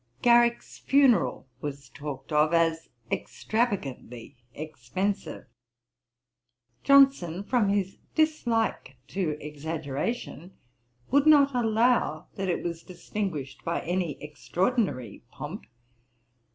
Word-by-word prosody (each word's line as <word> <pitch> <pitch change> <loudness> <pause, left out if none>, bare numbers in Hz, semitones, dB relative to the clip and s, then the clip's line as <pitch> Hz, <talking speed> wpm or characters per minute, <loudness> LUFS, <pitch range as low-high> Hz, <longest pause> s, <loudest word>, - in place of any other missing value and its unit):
Garrick's 235 0 +3
funeral 260 - +3
was 140 -2 -6
talked 140 -1 -8
of 155 +2 +3
as 165 -1 +1 0.2
extravagantly 140 - -3 0.2
expensive. 160 - -4 1.4
Johnson, 270 -11 +5
from 215 -1 +1
his 200 -1 -1 0.2
dislike 240 - 0
to 170 -6 -2
exaggeration, 155 - -5 0.5
would 285 +3 +4
not 285 -2 +6
allow 230 -8 +2
that 195 -1 -3
it 175 - -1
was 170 -1 -4
distinguished 175 -6 -5
by 170 - -1
any 175 -2 -2
extraordinary 150 - -2
pomp. 150 +10 -8
180 Hz, 90 wpm, -27 LUFS, 150-235 Hz, 1.4 s, not